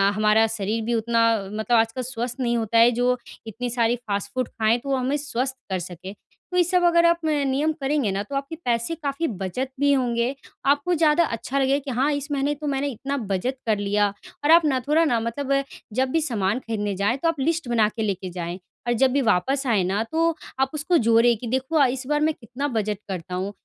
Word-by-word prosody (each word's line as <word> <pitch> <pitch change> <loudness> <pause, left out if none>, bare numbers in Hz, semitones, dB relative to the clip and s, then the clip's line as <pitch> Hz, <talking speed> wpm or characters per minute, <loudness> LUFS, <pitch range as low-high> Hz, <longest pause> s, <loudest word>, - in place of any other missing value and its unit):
हमारा 215 +1 +4
शरीर 220 0 -2
भी 240 - 0
उतना 230 +1 +2 0.3
मतलब 220 +3 +1
आजकल 225 +3 +1
स्वस्थ 245 -1 -4
नहीं 240 -2 +1
होता 230 0 0
है 230 +1 +7
जो 245 +1 +1 0.3
इतनी 245 +3 -4
सारी 235 0 +1
फास्ट 200 0 -2
फूड 255 -2 0
खाएँ 220 +1 +1
तो 275 - -8
वो 270 - +2
हमें 260 +3 0
स्वस्थ 265 -2 -3
कर 190 -1 -1
सके। 180 +2 -8 0.4
तो - - +1
ये 355 - +6
सब 360 +1 +1
अगर 340 0 +5
आप 340 0 +4
म - - +2 0.2
नियम 285 +4 +1
करेंगे 275 -4 +1
ना 195 - -1
तो 275 +7 -7
आपके 275 +4 -3
पैसे 235 +6 0
काफ़ी 285 +4 -1
बचत 205 - -3
भी 285 0 +3
होंगे, 245 -1 0 0.3
आपको 285 +5 +2
ज़्यादा 320 +1 +4
अच्छा 260 +2 -3
लगेगा 270 +1 +2
कि 275 - -3
हाँ 290 +3 +3
इस 285 0 -3
महीने 285 +1 0
तो 300 +1 -6
मैंने 280 0 0
इतना 275 +2 -3
बचत 220 +3 -2
कर 215 -2 +2
लिया, 205 +1 +1 0.4
और 295 - +4
आप 335 0 +7
ना 270 -3 +2
थोड़ा 315 +2 +4
ना 240 -7 +2
मतलब 275 +4 -1 0.3
जब 260 +3 +1
भी 325 - +2
सामान 220 -6 0
खरीदने 210 -4 -3
जाएँ, 205 +6 +1
तो 305 - -1
आप 330 -3 0
लिस्ट 320 +1 0
बना 225 -3 +3
के 220 - -6
लेके 190 -3 -2
जाएँ, 175 0 -5 0.3
और 240 - +3
जब 260 +2 +3
भी 280 - +2
वापस 265 +5 +1
आएँ 215 -6 +3
ना, 195 +4 0
तो 325 +6 0 0.2
आप 265 0 +2
उसको 310 +4 +1
जोड़े 230 0 +4
कि 235 +2 -7
देखो 260 +6 -1
अ, 285 - +6
इस 255 +1 -3
बार 295 0 +1
मैं 310 +1 +2
कितना 250 +3 -5
बचत 210 -1 -1
करता 180 -1 -5
हूँ, 190 +2 -2
250 Hz, 230 wpm, -24 LUFS, 220-280 Hz, 0.4 s, है